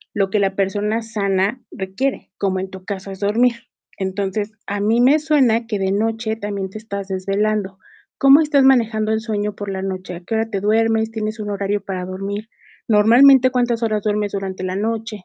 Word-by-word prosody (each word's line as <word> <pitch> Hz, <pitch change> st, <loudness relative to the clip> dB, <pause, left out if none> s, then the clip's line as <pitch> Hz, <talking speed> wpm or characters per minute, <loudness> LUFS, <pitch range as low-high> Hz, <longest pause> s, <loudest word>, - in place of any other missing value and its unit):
lo 195 Hz, -1 st, 0 dB
que 210 Hz, -, +2 dB
la 195 Hz, -1 st, 0 dB
persona 205 Hz, +3 st, -1 dB
sana 205 Hz, +1 st, -1 dB
requiere, 195 Hz, +6 st, -3 dB
como 190 Hz, -2 st, 0 dB
en 190 Hz, -, -4 dB
tu 190 Hz, -1 st, -10 dB
caso 195 Hz, 0 st, -5 dB
es 190 Hz, -, -9 dB
dormir. 230 Hz, +5 st, +2 dB, 0.4 s
Entonces, 195 Hz, +2 st, -2 dB
a 205 Hz, 0 st, -3 dB
mí 220 Hz, +3 st, +2 dB
me 270 Hz, +5 st, +5 dB
suena 260 Hz, -7 st, +2 dB
que 210 Hz, -, -2 dB
de 190 Hz, -1 st, -1 dB
noche 220 Hz, +2 st, -1 dB
también 200 Hz, -3 st, -4 dB
te 215 Hz, -, -7 dB
estás 200 Hz, -3 st, -6 dB
desvelando. 195 Hz, +1 st, -1 dB, 0.4 s
¿Cómo 275 Hz, +3 st, +7 dB
estás 295 Hz, -3 st, +3 dB
manejando 225 Hz, -5 st, +3 dB
el 220 Hz, 0 st, 0 dB
sueño 210 Hz, -2 st, -2 dB
por 205 Hz, -1 st, -6 dB
la 190 Hz, 0 st, -4 dB
noche? 185 Hz, -2 st, -5 dB
¿A -, -, -8 dB
qué 180 Hz, -, -6 dB
hora 225 Hz, 0 st, 0 dB
te 200 Hz, -3 st, -2 dB
duermes? 220 Hz, +2 st, +1 dB
¿Tienes 215 Hz, 0 st, -4 dB
un 210 Hz, -1 st, -4 dB
horario 200 Hz, 0 st, -1 dB
para 185 Hz, -2 st, -4 dB
dormir? 200 Hz, +4 st, -5 dB, 0.4 s
Normalmente, 245 Hz, +5 st, +6 dB
¿cuántas 245 Hz, -2 st, 0 dB
horas 215 Hz, -2 st, 0 dB
duermes 210 Hz, -1 st, 0 dB
durante 190 Hz, -2 st, -4 dB
la 185 Hz, 0 st, -2 dB
noche? 225 Hz, +2 st, -2 dB
210 Hz, 195 wpm, -20 LUFS, 195-225 Hz, 0.4 s, Cómo